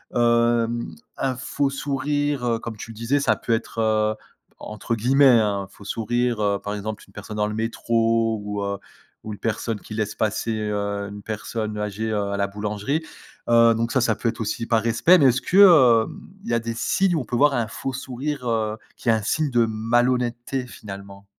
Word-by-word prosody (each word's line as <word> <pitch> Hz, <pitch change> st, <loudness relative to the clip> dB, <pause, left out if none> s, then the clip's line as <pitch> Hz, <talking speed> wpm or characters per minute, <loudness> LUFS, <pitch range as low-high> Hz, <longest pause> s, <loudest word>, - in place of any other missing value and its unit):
hem, 120 Hz, -3 st, +2 dB, 0.2 s
un 130 Hz, -1 st, -1 dB
faux 135 Hz, +2 st, -1 dB
sourire, 145 Hz, 0 st, -1 dB
heu, 115 Hz, -1 st, +1 dB
comme 115 Hz, -1 st, -7 dB
tu 115 Hz, +2 st, -8 dB
disais, 115 Hz, +6 st, 0 dB
ça 140 Hz, -, +2 dB
peut 115 Hz, -, -2 dB
être, 115 Hz, 0 st, -3 dB
heu, 110 Hz, -1 st, +2 dB, 0.5 s
entre 105 Hz, +2 st, -5 dB
guillemets, 130 Hz, +6 st, +3 dB
hein 100 Hz, -2 st, 0 dB
«un -, -, -10 dB
faux 100 Hz, -, -16 dB
sourire», 120 Hz, +2 st, -1 dB
heu, 100 Hz, -1 st, +1 dB
par 105 Hz, 0 st, -3 dB
exemple, 105 Hz, +1 st, -5 dB
une 95 Hz, -, -22 dB
personne 105 Hz, +1 st, -8 dB
dans 105 Hz, 0 st, +1 dB
le 105 Hz, -, -4 dB
métro 115 Hz, 0 st, 0 dB
ou 105 Hz, 0 st, -4 dB
heu, 100 Hz, 0 st, -2 dB, 0.5 s
ou 110 Hz, -, -5 dB
une 105 Hz, -, -10 dB
personne 115 Hz, -1 st, -2 dB
qui -, -, -10 dB
laisse 110 Hz, -1 st, -2 dB
passer, 110 Hz, +1 st, -1 dB
heu, 100 Hz, -1 st, -2 dB
une 100 Hz, 0 st, -9 dB
personne 110 Hz, 0 st, -4 dB
âgée, 105 Hz, +1 st, -3 dB
heu, 105 Hz, -1 st, 0 dB
à 100 Hz, -, -2 dB
la 100 Hz, 0 st, +1 dB
boulangerie. 105 Hz, +8 st, -2 dB, 0.5 s
Heu, 115 Hz, 0 st, +6 dB
donc 115 Hz, +1 st, -1 dB
ça 135 Hz, -, +2 dB
ça 115 Hz, -2 st, +2 dB
peut 115 Hz, -, -1 dB
être 115 Hz, -, -5 dB
aussi 115 Hz, +1 st, -2 dB
par 115 Hz, -2 st, +2 dB
respect 120 Hz, +10 st, +5 dB
mais 145 Hz, -, +4 dB
est 130 Hz, -, +7 dB
ce 125 Hz, -, -2 dB
que, 185 Hz, -, 0 dB, 0.5 s
hem, -, -, -10 dB, 0.2 s
il -, -, -4 dB
y -, -, +1 dB
a 115 Hz, -, +3 dB
des 115 Hz, 0 st, -4 dB
signes 185 Hz, +9 st, +1 dB
où -, -, +1 dB
on -, -, -8 dB
peut 120 Hz, -, -3 dB
voir 145 Hz, +3 st, +4 dB
un 120 Hz, -3 st, 0 dB
faux 135 Hz, +4 st, -5 dB
sourire, 130 Hz, +1 st, -4 dB
heu, 110 Hz, -1 st, -1 dB, 0.2 s
qui 120 Hz, -, -2 dB
est -, -, +7 dB
un 110 Hz, -1 st, +2 dB
signe 155 Hz, +7 st, 0 dB
de 120 Hz, -1 st, +3 dB
malhonnêteté 120 Hz, +3 st, 0 dB
finalement? 100 Hz, -3 st, -10 dB
115 Hz, 215 wpm, -23 LUFS, 105-120 Hz, 0.5 s, est